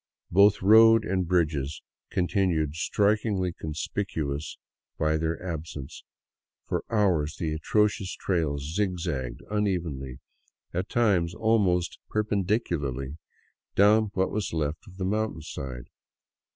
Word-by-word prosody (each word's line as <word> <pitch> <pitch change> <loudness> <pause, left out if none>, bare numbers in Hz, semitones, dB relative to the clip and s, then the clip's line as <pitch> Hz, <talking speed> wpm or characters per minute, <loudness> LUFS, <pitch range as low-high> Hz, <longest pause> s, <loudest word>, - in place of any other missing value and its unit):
Both 100 +2 +5
road 115 +2 +7
and 95 -1 0
bridges 75 -5 0 0.3
con 90 - +1
tinued 85 -7 +1
strikingly 100 +1 +1
conspicuous 75 -2 -4 0.4
by 80 0 +1
their 80 +1 -1
absence; 80 -5 -6 0.6
for - - -2
hours 90 -9 +1
the 80 -2 -2
atrocious 100 +4 +1
trail 80 -6 0
zigzagged 80 -5 -2
unevenly, 85 -11 -2 0.6
at 90 +3 -2
times 95 -8 +2
almost 100 -6 +1
perpendicularly 85 - -1 0.6
down 105 +2 +5
what 95 0 +1
was 105 -4 -2
left 80 +5 -2
of 95 -1 -14
the 95 - -2
mountainside. 80 - -3
90 Hz, 105 wpm, -27 LUFS, 75-100 Hz, 0.6 s, road